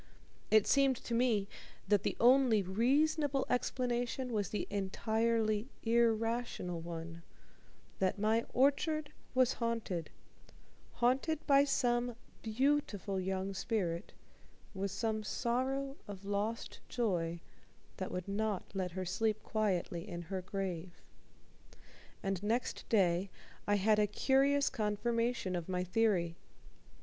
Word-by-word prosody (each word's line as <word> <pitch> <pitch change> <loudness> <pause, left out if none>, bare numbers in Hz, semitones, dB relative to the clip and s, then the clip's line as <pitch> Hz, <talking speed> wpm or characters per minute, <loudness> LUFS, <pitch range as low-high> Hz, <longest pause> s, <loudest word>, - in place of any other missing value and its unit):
It 215 -2 +5
seemed 275 -1 +4
to 235 - -6
me 230 -4 +2 0.4
that 205 -2 +4
the - - -2
only 245 -4 +5
reasonable 275 - +2
explanation 245 0 -1
was 205 -3 0
the 210 - -2
entirely 220 +2 0 0.2
irrational 230 -5 +1
one 165 0 -7 0.8
that 190 0 +1
my 220 +3 +2
orchard 290 +3 +2 0.2
was 255 -1 +4
haunted: 225 -8 -2 0.8
haunted 270 +6 +1
by 280 -1 +6
some 245 -3 +1 0.3
beautiful 220 -5 0
young 190 +1 -2
spirit, 190 -4 -2 0.6
with 195 0 -2
some 215 +3 -1
sorrow 265 +5 -1
of 200 -1 -8
lost 205 +3 -2
joy 175 -8 -1 0.6
that 185 - -4
would 180 0 -4
not 205 0 -2
let 185 -3 -2
her 185 0 -3
sleep 215 +4 0
quietly 185 -5 -1
in 175 0 -5
her 185 +2 -4
grave. 180 -2 -4 1.2
And 195 -2 -1
next 225 +4 -2
day 190 -3 +3 0.4
I 205 - +4
had 210 +2 +3
a 210 - +4
curious 275 +6 +3
confirmation 230 -2 0
of 175 0 -4
my 180 -1 0
theory. 180 -4 +1
215 Hz, 115 wpm, -34 LUFS, 190-245 Hz, 1.2 s, by